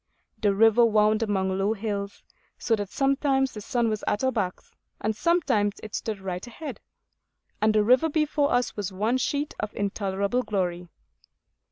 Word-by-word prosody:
The 205 -2 +2
river 225 +3 +5
wound 215 -1 +3
among 190 -3 0
low 200 +3 +2
hills, 200 -2 -4 0.3
so 230 - +1
that 205 -2 -4
sometimes 270 +1 +1
the 210 - -7
sun 240 +2 0
was 215 -1 -2
at 205 - 0
our 260 - +3
backs, 195 -7 -3 0.3
and 215 0 -1
sometimes 215 - +1
it 215 - -9
stood 220 -2 -3
right 185 +2 -5
ahead, 290 +6 -7 0.8
and 215 0 +3
the 210 - +4
river 255 +8 +4
before 300 -1 +1
us 245 -1 +1
was 205 -2 -3
one 215 +7 0
sheet 285 +4 -1
of 210 - -4
intolerable 200 +3 -1
glory. 180 -6 -2
215 Hz, 165 wpm, -26 LUFS, 200-250 Hz, 0.8 s, river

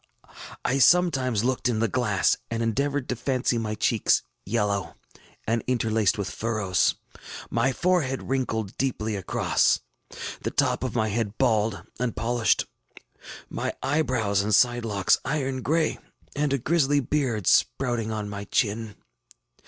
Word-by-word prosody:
I 135 +2 +1
sometimes 135 - +3
looked 125 0 0
in 115 - 0
the 115 - +2
glass, 105 -4 +1
and 115 0 -2
endeavored 140 +4 -1
to 125 - 0
fancy 125 -1 0
my 110 -1 -3
cheeks 110 +1 +2 0.2
yellow 100 -5 -1 0.5
and 115 0 0
interlaced 110 -5 +1
with 100 -2 -2
furrows, 105 -5 0 0.6
my 120 +3 +2
forehead 155 -4 0
wrinkled 110 -6 -2
deeply 110 -5 -1
across, 95 -3 +1 0.6
the - - -2
top - - 0
of 130 -3 -3
my 110 -2 +1
head 110 0 -2
bald 110 -5 +1 0.2
and 125 -2 -1
polished, 120 -1 +1 0.8
my - - -3
eyebrows 130 -8 +1
and 105 +1 +2
side 120 -1 +3
locks 100 -4 +2
iron 135 -1 -2
gray, 160 +5 0 0.4
and 145 -1 0
a 140 - +2
grisly 145 +1 +2
beard 130 - -1
sprouting 120 0 +2
on 105 -1 -3
my 100 0 -6
chin. 105 +1 -1
115 Hz, 135 wpm, -26 LUFS, 110-135 Hz, 0.8 s, sometimes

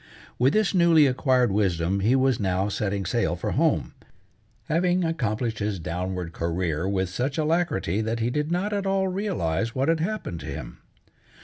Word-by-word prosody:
With 130 +3 +4
this 215 -2 +2
newly 170 -4 +5
acquired 130 -3 +2
wisdom 95 -2 +1
he 110 +7 +3
was 130 -2 +2
now 95 0 0
setting 100 -1 -2
sail - - 0
for - - -3
home, - - +1 0.7
having 180 +3 +1
accomplished 115 -8 -1
his 105 -1 -1
downward 90 0 -4
career 85 0 -1
with 95 -1 0
such 130 - -2
alacrity 155 - 0
that 115 +1 -2
he 115 +2 0
did 150 +3 -1
not 190 +4 0
at 200 -1 -1
all 195 0 +1
realize 115 - -2
what 135 +3 +1
had 165 -1 +2
happened 175 - -3
to - - -8
him. - - -7
115 Hz, 170 wpm, -25 LUFS, -, 0.7 s, newly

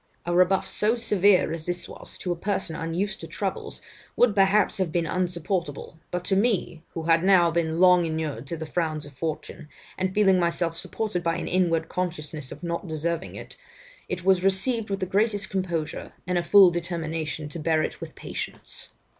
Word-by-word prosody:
A 175 - -1
rebuff 185 +2 +3
so 210 +4 +1
severe 200 -7 +3
as 165 0 -5
this 175 0 -2
was, - - -10
to 180 - -3
a - - 0
person 190 -2 -2
unused 190 +6 -2
to - - -7
troubles, - - -4 0.3
would 245 -4 +4
perhaps 200 +1 +3
have 185 -4 0
been 170 0 0
insupportable, 175 -3 -2
but 180 0 -3
to 195 - +2
me, 195 -6 +1
who 165 - -3
had 165 +1 +3
now 185 -3 +5
been 165 -1 0
long 180 -2 +6
inured 155 -6 -3
to 170 - -4
the 160 - -5
frowns 155 -2 -2
of 145 - -12
fortune, 155 +1 -5 0.3
and 185 0 0
feeling 190 -2 +4
myself 170 -1 0
supported 205 +1 -3
by 165 -1 0
an - - -4
inward 175 -3 +1
consciousness 155 -6 -4
of - - -9
not 170 +2 -3
deserving 165 +2 -3
it, - - -10 0.5
it 180 0 -4
was 190 -1 +4
received 210 +4 +1
with 195 0 -2
the - - +1
greatest 205 +1 0
composure, 170 -5 -3
and 180 0 +1
a - - +1
full 195 0 +7
determination 160 -3 -3
to 165 - -7
bear 155 0 +2
it - - -4
with - - -8
patience. - - -7
175 Hz, 190 wpm, -26 LUFS, 165-190 Hz, 0.5 s, full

